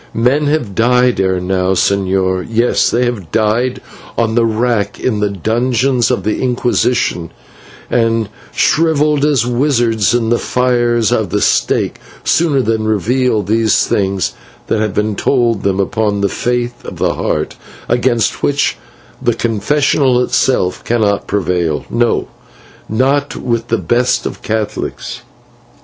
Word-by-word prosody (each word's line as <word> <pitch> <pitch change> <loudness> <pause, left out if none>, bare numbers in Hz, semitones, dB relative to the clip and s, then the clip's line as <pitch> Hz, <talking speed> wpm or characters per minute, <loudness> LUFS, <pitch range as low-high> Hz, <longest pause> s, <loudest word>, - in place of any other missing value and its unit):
Men 130 +6 +2
have 145 -9 -1
died 125 +3 +2
ere 95 -1 +1
now, 90 +1 0
señor; 95 -1 +1
yes, 115 +2 +2
they 125 +1 +1
have 105 -10 -4
died 115 +4 +1 0.4
on 115 -1 +1
the 115 0 +3
rack 110 -2 -1
in 110 -5 -1
the 105 0 +1
dungeons 120 +5 0
of 125 - -1
the 110 - -1
Inquisition, 120 -8 0 0.6
and 115 -2 +1 0.2
shrivelled 150 -2 +2
as 145 -6 +2
wizards 120 -4 +1
in 115 -2 0
the 120 - +2
fires 120 -3 +1
of - - 0
the - - 0
stake, - - +1 0.2
sooner 150 -6 +2
than 110 -1 0
reveal 110 +2 +1
those 110 +2 +2
things 95 -2 -1 0.3
that 110 - 0
have 105 -3 -1
been 105 0 0
told 120 -3 +1
them 100 -1 0
upon 105 0 0
the 100 - +1
faith 120 +2 -2
of - - -8
the - - +1
Heart, - - -2 0.3
against 120 -3 +1
which 145 0 +1 0.4
the 120 -3 +1
confessional 125 +4 +1
itself 95 -9 0
cannot 105 -4 0
prevail 90 -6 -1
no, 120 0 +1 0.6
not 135 +5 +1
with 115 -2 -2
the 115 - +1
best 120 +7 0
of - - -5
Catholics." 110 -1 -4
115 Hz, 135 wpm, -15 LUFS, 105-125 Hz, 0.6 s, the